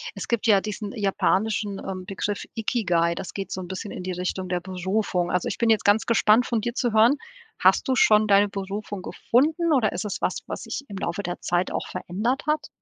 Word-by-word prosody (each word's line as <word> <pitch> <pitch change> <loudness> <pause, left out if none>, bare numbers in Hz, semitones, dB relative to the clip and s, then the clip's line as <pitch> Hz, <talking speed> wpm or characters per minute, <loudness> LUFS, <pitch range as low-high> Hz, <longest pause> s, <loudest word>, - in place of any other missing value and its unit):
Es - - -6
gibt 235 -2 -1
ja 200 -3 +5
diesen 210 0 -5
japanischen, 205 0 0
ähm, 185 -1 -6
Begriff 200 +1 -3
Ikigai, 175 -7 +1
das 185 - -6
geht 195 -1 -5
so 185 - -3
'n 180 - -7
bisschen 190 +3 -6
in 180 - -6
die 185 - -3
Richtung 185 +1 -3
der 180 0 -1
Berufung. 185 0 -1
Also, 180 - 0
ich - - -3
bin 235 - +1
jetzt 220 -1 +3
ganz 205 +2 +4
gespannt 230 0 +4
von 230 -2 -1
dir 235 +1 -2
zu 240 -4 0
hören: 225 +5 +6 0.4
Hast - - +4
du 260 - +2
schon 215 -2 +5
deine 200 0 +5
Berufung 200 0 -5
gefunden 315 - +1
oder 225 -7 +3
ist - - -4
es 205 - -3
was, - - 0
was - - -5
sich - - -5
im 200 - -7
Laufe 190 +2 -3
der 175 0 -4
Zeit 175 +1 0
auch - - -3
verändert 210 +9 -2
hat? 305 0 0
205 Hz, 220 wpm, -25 LUFS, 185-225 Hz, 0.4 s, hören